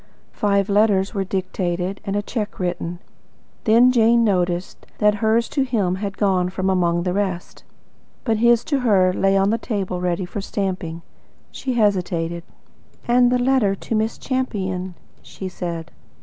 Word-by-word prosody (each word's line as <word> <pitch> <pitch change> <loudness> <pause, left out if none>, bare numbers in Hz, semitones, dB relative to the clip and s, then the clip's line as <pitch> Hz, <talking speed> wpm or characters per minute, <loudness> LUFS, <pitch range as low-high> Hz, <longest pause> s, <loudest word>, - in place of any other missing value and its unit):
Five 200 -1 +1
letters 205 -1 +2
were 195 -2 -1
dictated 185 0 -3
and 200 -1 -3
a 205 - 0
cheque 210 -2 -4
written. 175 -1 -3 0.7
Then 235 +3 +6
Jane 235 -1 +4
noticed 180 -3 -1
that 210 -1 +4
hers 225 +1 +2
to 285 - -1
him 220 -9 0
had 195 0 -4
gone 185 -3 +1
from 190 +1 -1
among 175 -2 +1
the 180 0 -1
rest. 190 -3 -3 0.6
But 225 -3 +1
his 235 +1 +4
to 285 -3 0
her 195 -7 +3
lay 195 +1 +2
on 195 +1 +3
the 230 - 0
table 195 -6 -3
ready 180 +1 -1
for 200 +3 -5
stamping. 185 -5 -3 0.5
She 260 - -3
hesitated. 180 -6 0 0.7
"And 245 +1 +5
about 250 - +3
the 245 - -1
letter 250 -7 +2
to 210 - -6
Miss 220 +1 0
Champion?" 190 -9 -3 0.3
she 190 - -8
said. 170 -2 -5
195 Hz, 160 wpm, -21 LUFS, 180-220 Hz, 0.7 s, Then